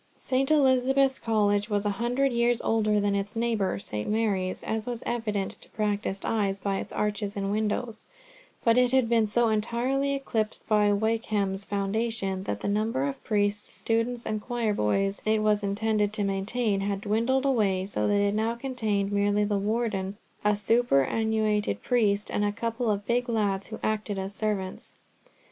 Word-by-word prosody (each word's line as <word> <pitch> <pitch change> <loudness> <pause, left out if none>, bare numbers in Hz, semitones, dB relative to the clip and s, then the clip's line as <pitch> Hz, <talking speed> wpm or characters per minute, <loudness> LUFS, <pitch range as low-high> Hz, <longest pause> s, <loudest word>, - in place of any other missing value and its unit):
St. 265 +1 0
Elizabeth's 270 -2 +3
College 205 -2 +1
was 205 -1 0
a 205 - +2
hundred 255 +3 +1
years 235 0 +2
older 215 -2 +2
than 205 0 +1
its 200 +1 -2
neighbour 225 - 0
St. 105 +1 -5
Mary's, 200 -4 0
as 220 0 -3
was 240 -2 -4
evident 210 -5 -2
to - - -13
practised 205 -2 -2
eyes 200 -3 0
by 195 0 -1
its - - -6
arches 205 -1 -2
and 195 0 -1
windows, 215 +2 -2 0.6
but 230 +1 +4
it 250 -1 +3
had 260 -3 +4
been 225 -2 +3
so 235 +2 +3
entirely 245 +6 0
eclipsed 225 -6 -3
by 210 -1 +4
Wykeham's 205 -2 0
foundation 200 -1 -1
that 105 0 -3
the - - -2
number 210 -8 0
of 140 - -6
priests, 205 0 0
students, 230 +1 -1
and 215 -1 -2
choir 235 -2 -1
boys 195 - 0
it 215 0 +1
was 210 -1 +3
intended 210 +1 0
to 215 -2 -1
maintain, 200 +2 0
had 200 0 -2
dwindled 235 +6 +1
away, 200 -8 +2
so 200 - -1
that 205 - +2
it 205 0 +2
now 220 +2 0
contained 220 -6 -1
merely 205 +1 +2
the 205 -1 0
Warden, 205 -2 -1 0.3
a 210 0 +3
superannuated 215 - +1
priest, 210 -5 +1
and 205 - 0
a 205 - +1
couple 230 +2 -2
of 205 -1 -1
big 245 +2 0
lads 200 -4 0
who 220 - -6
acted 215 -1 -1
as 190 +1 -4
servants. 205 -3 -3
215 Hz, 170 wpm, -27 LUFS, 200-230 Hz, 0.6 s, but